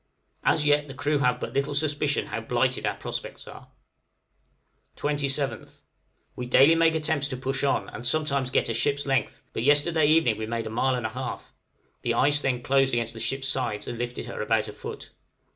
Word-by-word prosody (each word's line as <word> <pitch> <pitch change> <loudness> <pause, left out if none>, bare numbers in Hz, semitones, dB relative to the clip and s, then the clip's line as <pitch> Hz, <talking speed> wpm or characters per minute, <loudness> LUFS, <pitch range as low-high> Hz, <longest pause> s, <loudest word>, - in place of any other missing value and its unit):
As 150 - +2
yet 145 0 +3
the 135 - -9
crew 145 +1 0
have 125 -2 +2
but - - -5
little 140 +1 0
suspicion 145 -1 +1
how 115 +1 -4
blighted 125 +3 0
our - - -1
prospects - - -6
are. - - -11 1.3
27th. 140 -4 -2 0.5
We 125 - -5
daily 135 +5 +6
make 165 0 +3
attempts 155 -2 0
to 130 -3 -4
push 135 +1 -2
on, 140 - +1
and 115 - -8
sometimes 140 -2 0
get - - +1
a 115 - -1
ship's 140 +5 0
length, 135 -5 -1
but - - -2
yesterday 145 +4 +4
evening 150 -9 +3
we 110 - -3
made 115 0 -3
a - - -5
mile 130 +3 +1
and 120 -2 -3
a - - 0
half! 130 +2 -6 0.5
the - - 0
ice 145 +1 +3
then 125 -3 -1
closed 135 0 +2
against 115 -1 -1
the 115 - -9
ship's 135 +3 -1
sides 120 -6 -1
and 120 - -5
lifted 120 0 -4
her - - -6
about 110 0 +1
a 105 - -7
foot. 105 - -8
135 Hz, 195 wpm, -26 LUFS, 120-145 Hz, 1.3 s, daily